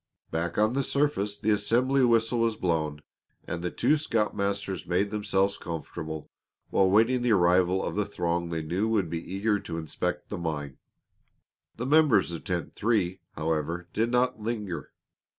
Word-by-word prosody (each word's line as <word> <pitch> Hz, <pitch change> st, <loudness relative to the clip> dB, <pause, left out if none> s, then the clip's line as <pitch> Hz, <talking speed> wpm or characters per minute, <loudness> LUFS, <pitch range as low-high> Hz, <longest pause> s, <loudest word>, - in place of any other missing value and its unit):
Back 85 Hz, +1 st, -2 dB
on 110 Hz, +2 st, +3 dB
the 140 Hz, -, +1 dB
surface 135 Hz, -8 st, 0 dB
the 110 Hz, +1 st, +1 dB
assembly 125 Hz, +6 st, +2 dB
whistle 115 Hz, 0 st, +3 dB
was 115 Hz, -1 st, +2 dB
blown, 75 Hz, -5 st, -1 dB, 0.4 s
and 85 Hz, -, -4 dB
the 90 Hz, -, -1 dB
two 150 Hz, -, +2 dB
scoutmasters 100 Hz, -7 st, -1 dB
made 100 Hz, +3 st, +1 dB
themselves 100 Hz, -2 st, 0 dB
comfortable 80 Hz, -1 st, -6 dB, 0.4 s
while 95 Hz, -1 st, +4 dB
waiting 115 Hz, +5 st, +4 dB
the 120 Hz, -2 st, +3 dB
arrival 90 Hz, 0 st, +3 dB
of -, -, -2 dB
the 105 Hz, -, +1 dB
throng 85 Hz, -3 st, -2 dB
they 80 Hz, -1 st, -2 dB
knew 90 Hz, +7 st, 0 dB
would 100 Hz, -7 st, +1 dB
be 85 Hz, -1 st, -2 dB
eager 105 Hz, +2 st, +1 dB
to 85 Hz, -3 st, -6 dB
inspect 80 Hz, -2 st, -3 dB
the -, -, -4 dB
mine. 75 Hz, -5 st, -4 dB, 1.0 s
The 120 Hz, -, -4 dB
members 140 Hz, -, +4 dB
of 85 Hz, -, -6 dB
Tent 85 Hz, -5 st, -3 dB
Three, 100 Hz, -5 st, 0 dB, 0.2 s
however, 80 Hz, +3 st, -2 dB
did 115 Hz, +2 st, +1 dB
not 125 Hz, -2 st, +1 dB
linger. 105 Hz, -5 st, -4 dB
100 Hz, 160 wpm, -28 LUFS, 85-115 Hz, 1.0 s, while